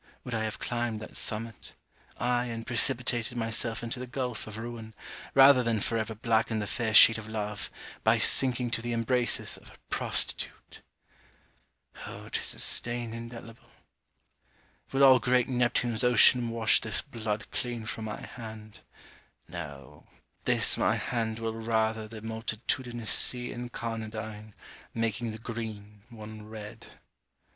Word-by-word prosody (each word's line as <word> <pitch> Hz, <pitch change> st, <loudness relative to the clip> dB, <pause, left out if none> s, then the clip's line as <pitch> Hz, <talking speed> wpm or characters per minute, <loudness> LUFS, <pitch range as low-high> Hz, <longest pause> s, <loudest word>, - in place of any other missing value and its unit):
would 125 Hz, -, -6 dB
I 110 Hz, -1 st, -1 dB
have 110 Hz, +2 st, -4 dB
climbed 120 Hz, -2 st, -2 dB
that 110 Hz, -, -10 dB
summit 110 Hz, -1 st, -5 dB, 0.4 s
aye 125 Hz, 0 st, +1 dB
and 115 Hz, -1 st, -5 dB
precipitated 120 Hz, -1 st, 0 dB
myself 115 Hz, 0 st, -2 dB
into 115 Hz, +1 st, -4 dB
the 125 Hz, -, -6 dB
gulph 125 Hz, -3 st, -4 dB
of 110 Hz, -1 st, -8 dB
ruin, 115 Hz, -1 st, -7 dB, 0.4 s
rather 135 Hz, -1 st, +8 dB
than 115 Hz, -2 st, 0 dB
forever 110 Hz, +1 st, -2 dB
blacken 110 Hz, 0 st, +1 dB
the 105 Hz, -, -2 dB
fair 110 Hz, 0 st, -2 dB
sheet 115 Hz, +1 st, +9 dB
of 110 Hz, -, -9 dB
love, 105 Hz, -1 st, -4 dB, 0.3 s
by -, -, +4 dB
sinking 125 Hz, -2 st, +2 dB
to 115 Hz, -, 0 dB
the 120 Hz, 0 st, -3 dB
embraces 120 Hz, +1 st, +1 dB
of -, -, -16 dB
a -, -, -16 dB, 0.2 s
prostitute! -, -, -2 dB, 1.3 s
Oh -, -, -9 dB
'tis -, -, -2 dB
a -, -, -15 dB
stain 120 Hz, -1 st, +4 dB
indelible! 115 Hz, 0 st, -10 dB, 1.2 s
Will 135 Hz, +1 st, +3 dB
all 130 Hz, -2 st, +8 dB
great 125 Hz, -1 st, +2 dB
Neptune's 120 Hz, -2 st, +2 dB
ocean 125 Hz, 0 st, +6 dB
wash 115 Hz, -1 st, +4 dB
this 110 Hz, -2 st, +1 dB
blood 110 Hz, -6 st, -4 dB
Clean 120 Hz, -2 st, -4 dB
from 110 Hz, 0 st, -5 dB
my 105 Hz, -1 st, -5 dB
hand? 110 Hz, -3 st, -10 dB, 0.7 s
No; 75 Hz, -4 st, -9 dB, 0.4 s
this -, -, +4 dB
my -, -, +3 dB
hand 115 Hz, -2 st, -2 dB
will 115 Hz, 0 st, -3 dB
rather 110 Hz, -1 st, -1 dB
The 110 Hz, -1 st, -10 dB
multitudinous 115 Hz, +1 st, -3 dB
sea 125 Hz, 0 st, +4 dB
incarnadine, 110 Hz, -3 st, -6 dB, 0.4 s
Making 115 Hz, +1 st, -1 dB
the 110 Hz, -, -7 dB
green, 110 Hz, -3 st, -7 dB
one 110 Hz, -2 st, -10 dB
red. 105 Hz, -1 st, -9 dB
115 Hz, 140 wpm, -29 LUFS, 110-120 Hz, 1.3 s, sheet